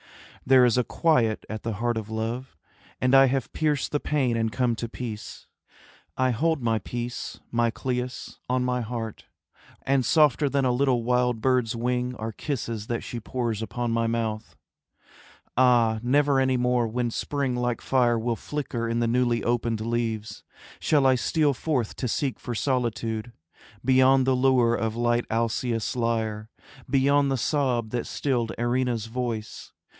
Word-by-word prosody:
There 130 -1 +7
is 125 0 +3
a - - +2
quiet 120 -8 +1
at 110 0 -5
the 115 - -3
heart 120 +3 -1
of 110 -1 -4
love, 115 +4 -4 0.4
And 125 +1 +1
I 135 0 +8
have 130 -1 -2
pierced 150 -3 0
the 145 - +1
pain 135 -6 0
and 115 -1 0
come 120 +2 +1
to 115 - -4
peace. 115 -3 -7 0.7
I 130 0 +2
hold 160 +5 0
my 115 -1 +1
peace, 120 +4 -5
my 120 0 +2
Cleis, 125 +1 -4
on 125 0 +1
my 125 0 0
heart; 115 -1 -5 0.6
And 135 -1 +2
softer 150 -1 +3
than 140 -1 +1
a 125 - +3
little 125 -1 +1
wild 125 -1 +1
bird's 125 -1 +1
wing 125 +1 -1
Are 110 0 -4
kisses 115 -4 -4
that 120 -1 -2
she 120 - -5
pours 115 -1 -3
upon 120 +1 -3
my 115 0 +1
mouth. 115 -2 -3 1.0
Ah, 120 -3 +4
never 140 +3 +3
any 130 -1 +2
more 125 -1 +1
when 120 +1 -2
spring 140 0 -2
like 120 -1 -1
fire 120 -3 +2
Will 115 +1 -1
flicker 120 -4 -4
in 115 0 0
the 120 - +2
newly 120 0 +1
opened 115 -2 0
leaves, 115 -1 -3 0.4
Shall 145 -3 +2
I 130 - +6
steal 145 +3 +1
forth 130 -4 -2
to 125 - -2
seek 135 +3 -1
for 120 - -5
solitude 115 -3 -1 0.5
Beyond 130 0 +5
the 130 0 +3
lure 125 -2 +3
of 115 -1 -1
light 120 0 +1
Alcaeus' 115 0 -1
lyre, 110 -2 -1 0.4
Beyond 140 +1 +3
the 135 - +1
sob 125 -4 0
that 120 -1 -2
stilled 120 -5 -1
Erinna's 120 -2 0
voice. 115 -2 -5
120 Hz, 160 wpm, -26 LUFS, 115-130 Hz, 1.0 s, I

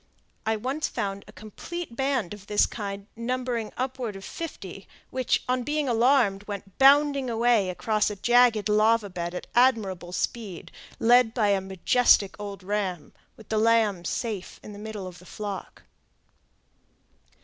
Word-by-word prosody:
I 220 - +2
once 260 +8 -2
found 200 0 -4
a - - -12
complete 240 - -8
band 265 -8 -1
of 205 -1 -12
this 210 0 +3
kind 200 -2 -6
numbering 240 -1 -2
upward 255 -4 -3
of 195 - -9
fifty, 195 - -7 0.2
which, 255 -1 0
on 255 0 +1
being 295 +3 -1
alarmed, 235 -4 +3
went 200 -2 -8
bounding 280 -1 +5
away 230 -4 +2
across 215 +3 0
a 210 - -5
jagged 240 -1 +4
lava 215 0 +3
bed 175 0 -4
at - - -5
admirable 210 -8 +2
speed, 200 -1 -4 0.3
led 240 0 +4
by 215 -4 +2
a 200 -1 +2
majestic 190 +2 +3
old 200 -2 -7
ram, 190 -5 -3 0.2
with 220 - -16
the 220 - +1
lambs 220 -5 +2
safe 215 -6 -4
in 210 - -9
the 205 - -10
middle 210 -2 -6
of 180 -1 -9
the 180 - -16
flock. 205 -2 -7
215 Hz, 150 wpm, -26 LUFS, 200-245 Hz, 0.3 s, bounding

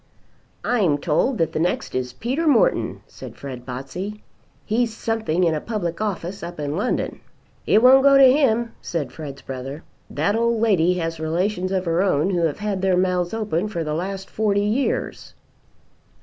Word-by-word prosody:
"I'm 195 -12 +2
told 170 - +1
that 165 -1 0
the - - -1
next 175 +2 -1
is 125 -1 -2
Peter 260 - -2
Morton," - - +2
said - - -11
Fred 130 -3 -8
Botsey. 180 +12 -6 0.4
"He's 230 +2 +1
something 220 -7 -1
in 165 -2 +3
a 155 - -2
public 190 -6 -3
office 195 -2 -3
up 170 -1 -7
in 145 0 -2
London." 210 +8 -1 0.5
"It 220 - +4
won't 265 +1 +8
go 275 0 +6
to 265 -2 +8
him," 235 -5 +2
said 150 -7 -3
Fred's 140 -2 -8
brother. 135 +4 -6 0.3
"That 205 - 0
old 235 0 +1
lady 180 -6 +3
has 165 -2 -3
relations 180 +4 -1
of 190 -1 -1
her 165 +1 +1
own 185 -2 +2
who 170 -3 +2
have 150 - -5
had 205 -2 -2
their 190 -1 +2
mouths 180 -1 +1
open 215 -4 -1
for 170 -6 -3
the 150 -1 -3
last 190 +4 -4
forty 205 -2 0
years." 235 +6 -2
185 Hz, 175 wpm, -22 LUFS, 160-220 Hz, 0.5 s, won't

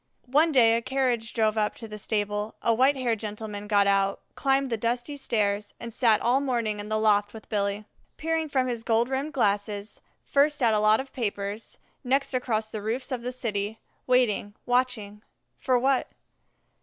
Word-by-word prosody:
One 310 +4 +4
day 230 -5 +5
a 230 - 0
carriage 245 -3 0
drove 220 -1 +1
up 210 0 0
to 225 - -9
the 210 0 -8
stable; 210 0 -2
a 230 - +3
white 260 +5 +4
haired 240 -4 0
gentleman 210 -1 -6
got 205 -1 +4
out, 195 0 +2
climbed 270 -1 +1
the - - +2
dusty 240 +5 -2
stairs, 210 -6 -1
and 235 -1 -7
sat 225 -3 +3
all 245 +3 +3
morning 235 -6 -1
in 205 +1 -6
the 215 - +1
loft 210 -1 +2
with 220 - -11
Billy. 200 0 -1 0.3
Peering 320 -1 -1
from 265 -2 +1
his 240 -3 -3
gold 230 +1 +1
rimmed 275 +3 -2
glasses, 205 -3 -1 0.2
first 290 0 +2
at 230 -2 +4
a 210 - +3
lot 215 +1 +4
of 265 0 -7
papers, 205 -2 -4 0.3
next 270 +2 +1
across 225 -4 0
the 215 -1 -6
roofs 235 +6 -2
of 250 -2 -2
the 250 +1 -4
city, 215 -4 -3 0.3
waiting, 230 -5 +2
watching, 245 -5 0 0.3
for 255 -1 +1
what? 265 +1 +2
225 Hz, 180 wpm, -26 LUFS, 210-255 Hz, 0.3 s, day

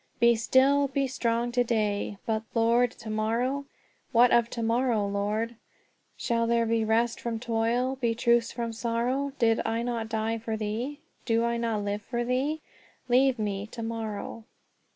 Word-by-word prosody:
"'Be 235 0 +5
still; 270 +5 +3
be 275 0 0
strong 240 -2 -1
to 245 0 +2
day.' 210 -3 -1
But, 220 -1 0
Lord, 235 +2 +4
to 225 -1 -11
morrow? 235 +6 0 0.5
What 245 +1 +5
of 235 -1 +4
to 235 - -4
morrow, 230 -2 +1
Lord? 210 +3 -2 0.6
Shall 230 -1 0
there 235 0 +2
be 225 0 +1
rest 230 +2 +1
from 230 -1 -3
toil, 240 +3 0
Be 230 -2 +1
truce 235 0 +2
from 235 -1 -4
sorrow? 245 +5 -1
'Did 225 -1 +3
I 230 +1 -1
not 235 -2 -3
die 225 0 -1
for 220 0 -3
thee? 230 +8 -3 0.2
Do 230 -1 +2
I 235 0 0
not 225 -3 -1
live 205 +1 -2
for 240 +3 -3
thee? 275 +6 0 0.5
Leave 260 +1 +4
me 205 -1 -2
to 230 +1 -7
morrow.'" 225 -1 -5
230 Hz, 165 wpm, -28 LUFS, 225-245 Hz, 0.6 s, Be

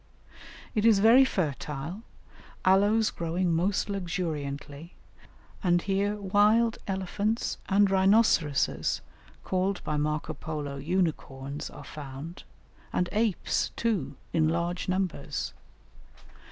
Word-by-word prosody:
It 215 - +1
is 225 -2 +6
very 225 +6 +7
fertile, 155 - -3 0.6
aloes 205 +4 +4
growing 170 +1 -1
most 185 +5 +1
luxuriantly; 165 -5 -4 0.7
and 175 -2 +4
here 200 +1 0
wild 210 +3 +3
elephants 200 +4 -1
and 200 +1 +5
rhinoceroses 190 -7 +3 0.4
(called 190 +1 -1
by 150 - -1
Marco 150 +1 -1
Polo 145 -2 -5
unicorns) 145 -3 -2
are - - -11
found, 150 +3 -8 0.5
and 180 0 0
apes, 215 -3 0
too, 180 -13 -1 0.2
in 160 -1 +3
large 170 +2 -1
numbers. 185 -6 -2
180 Hz, 100 wpm, -28 LUFS, 150-205 Hz, 0.7 s, very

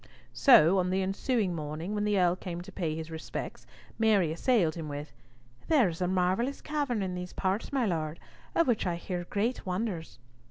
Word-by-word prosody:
So 195 - +6
on 180 0 +1
the 190 +1 +1
ensuing 195 +1 0
morning, 155 +4 -4
when 210 0 0
the 205 -2 +2
Earl 175 -1 +3
came 175 -2 -6
to 175 - -10
pay 160 -4 -2
his 160 0 -6
respects, 160 0 -6 0.3
Mary 205 -7 +3
assailed 170 -1 +2
him 160 -2 -6
with, 145 +1 -6 0.5
"There 265 - +4
is 165 +1 -7
a 180 - +2
marvellous 185 +9 +1
cavern 280 -8 -1
in 185 -1 -3
these 180 0 -6
parts, 195 +3 -1
my 270 -4 +1
Lord, 160 -4 -2 0.4
of 335 - +4
which 225 -6 +1
I 175 - 0
hear 175 0 -4
great 220 +7 -1
wonders." 185 -3 -3
185 Hz, 190 wpm, -29 LUFS, 170-220 Hz, 0.5 s, So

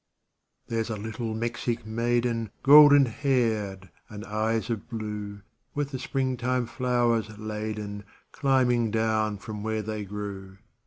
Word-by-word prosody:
128 115 - -5
There's 115 0 -1
a 110 -2 -3
little 110 +1 -4
Mexic 120 0 -2
maiden, 115 0 0
Golden 145 0 +9
haired 110 -7 -1 0.2
and 105 -1 -8
eyes 110 +2 -1
of 110 -3 -4
blue, 105 -3 -5 0.3
With 145 -1 -2
the 130 - -4
springtime 130 -2 -1
flowers 115 -2 0
laden, 105 -1 -5 0.3
Climbing 125 -4 +2
down 110 -1 0
from 105 +1 -7
where 110 0 -2
they 110 0 -4
grew. 100 -1 -7
110 Hz, 125 wpm, -27 LUFS, 105-120 Hz, 0.3 s, Golden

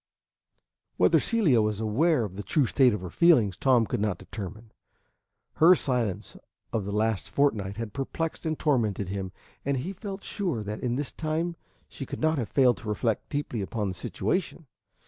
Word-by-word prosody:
Whether - - +5
Celia 175 - +3
was 105 -1 -1
aware 125 +6 +2
of 100 -4 -6
the 100 - -4
true 130 - +1
state 130 +1 +4
of 105 -4 -3
her 90 - -7
feelings, 125 - +4
Tom 125 -1 +3
could - - -2
not 105 -4 0
determine. 110 +2 -8 0.9
Her 175 +3 +7
silence 110 - -2 0.4
of 110 -4 -1
the 100 - -4
last 110 0 0
fortnight 105 -9 0
had 115 -2 -5
perplexed 160 +4 -3
and 155 -1 -1
tormented 110 - 0
him; 95 -1 -4 0.3
and 140 0 0
he 175 +10 -4
felt 195 0 -7
sure 175 - -2
that 105 +1 -5
in 120 -1 -1
this 145 +1 -3
time 160 +2 -2 0.3
she 135 - -8
could - - -6
not 155 -1 +2
have 115 -5 -3
failed 130 -4 +4
to 105 - -7
reflect 110 +1 -1
deeply 145 -6 -2
upon 105 +1 -2
the - - -3
situation. 165 - -2
120 Hz, 180 wpm, -27 LUFS, 105-155 Hz, 0.9 s, Her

